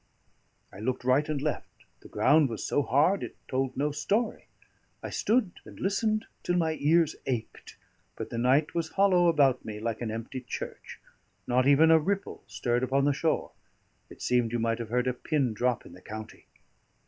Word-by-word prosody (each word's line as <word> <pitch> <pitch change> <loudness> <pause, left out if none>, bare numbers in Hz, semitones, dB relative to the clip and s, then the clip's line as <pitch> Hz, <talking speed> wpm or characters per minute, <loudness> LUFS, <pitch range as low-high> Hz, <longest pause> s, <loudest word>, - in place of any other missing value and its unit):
I 95 - -10
looked 125 +4 -2
right 130 +4 +2
and 150 -2 -1
left; 150 +2 -5
the - - -14
ground 150 -2 +4
was 115 - -5
so 145 - +1
hard, 145 - +2
it - - -6
told 130 0 -2
no 145 +2 0
story. 200 +11 -1 0.6
I - - -5
stood 220 -4 +1
and - - -13
listened 215 +2 0 0.2
till 175 - -1
my 160 -2 +1
ears 160 +2 +3
ached, 120 -4 -5 0.4
but - - -6
the 115 - -3
night 135 +5 +2
was 165 -2 -2
hollow 185 -3 +5
about 140 -6 +3
me 105 -1 -6
like 115 +1 -3
an 115 - -2
empty 115 +4 -5
church; 125 - -7 0.5
not 125 +2 +2
even 155 +3 +6
a 160 - +7
ripple 195 +5 -3
stirred 120 0 -1
upon 135 +2 +1
the 145 - +3
shore; 160 +3 -1 0.6
it - - -11
seemed 120 -2 +1
you 120 - 0
might 115 0 0
have 115 -2 -5
heard 125 +2 +1
a 125 - +1
pin 130 -2 -1
drop 125 +2 -1
in - - -13
the 90 - -14
county. 110 +2 -9
135 Hz, 185 wpm, -28 LUFS, 120-160 Hz, 0.6 s, a